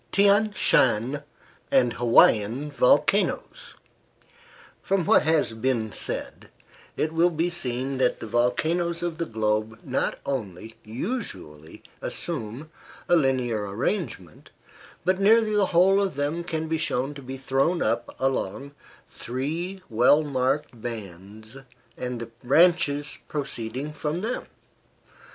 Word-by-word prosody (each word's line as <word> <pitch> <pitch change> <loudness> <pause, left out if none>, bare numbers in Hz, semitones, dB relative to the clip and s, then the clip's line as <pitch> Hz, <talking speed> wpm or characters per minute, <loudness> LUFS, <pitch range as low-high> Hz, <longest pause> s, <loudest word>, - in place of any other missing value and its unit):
THIAN 205 +2 +4
SHAN 130 - +2 0.5
AND 125 -3 +3
HAWAIIAN 120 +3 +4
VOLCANOES 200 - +1 1.1
From 195 -3 0
what - - +5
has 155 -7 +1
been 110 -1 -1
said, - - -4 0.5
it 155 +1 -1
will 170 +2 +4
be 170 +1 -1
seen 130 -4 -3
that 125 -1 +2
the - - -6
volcanoes 160 +10 0
of 170 -2 -3
the 170 - -2
globe 110 0 -1
not 130 - -1
only 110 -5 -5
usually 110 - -6 0.2
assume 120 +9 -5 0.4
a 175 - +5
linear 125 -8 +1
arrangement, 110 - -4 0.6
but 185 +1 +1
nearly 215 +1 +4
the 200 -2 +3
whole 190 +3 +4
of 195 -6 -1
them 145 +4 -2
can 160 -2 -3
be 160 0 -1
shown 135 -2 -1
to 140 - -10
be 130 +1 -7
thrown 135 +6 +1
up 120 0 -1
along 135 +1 -2 0.3
three 165 +10 -4
well 125 +7 +4
marked 135 -2 -1
bands 110 +1 -8 0.4
and 125 -1 -4
the 115 0 -7
branches 150 0 +3
proceeding 135 0 -4
from 150 +3 -3
them. 230 +4 -3
135 Hz, 120 wpm, -25 LUFS, 115-170 Hz, 1.1 s, what